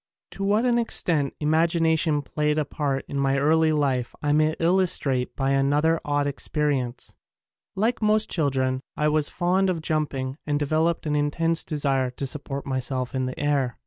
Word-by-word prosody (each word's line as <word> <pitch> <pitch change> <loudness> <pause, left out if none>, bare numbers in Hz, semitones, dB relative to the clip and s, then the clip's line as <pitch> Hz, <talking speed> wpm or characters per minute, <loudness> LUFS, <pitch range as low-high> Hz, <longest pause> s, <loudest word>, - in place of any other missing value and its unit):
To 195 - -6
what 210 +4 +2
an 240 -1 +3
extent 160 - 0
imagination 160 -1 +2
played 150 +2 -1
a 155 - +1
part 140 -2 -2
in 140 - -3
my 135 0 +1
early 160 +3 +3
life 135 -5 0
I 145 0 +2
may 155 +1 +2
illustrate 165 -7 +1
by 135 0 0
another 145 +4 +2
odd 145 0 0
experience. 140 -3 -2 0.6
Like 225 +5 0
most 215 0 +2
chil 155 -5 0
dren 130 -1 -1 0.2
I 150 - +1
was 150 -1 +1
fond 185 +2 +1
of 165 -4 -2
jumping 145 -3 -2
and 145 -1 +1
developed 155 +4 0
an 150 -1 0
intense 165 +3 +1
desire 135 -4 0
to 125 +2 -5
support 140 +1 -4
myself 130 -1 -2
in 130 -1 -1
the 130 - -6
air. 140 -4 0
150 Hz, 170 wpm, -24 LUFS, 135-160 Hz, 0.6 s, an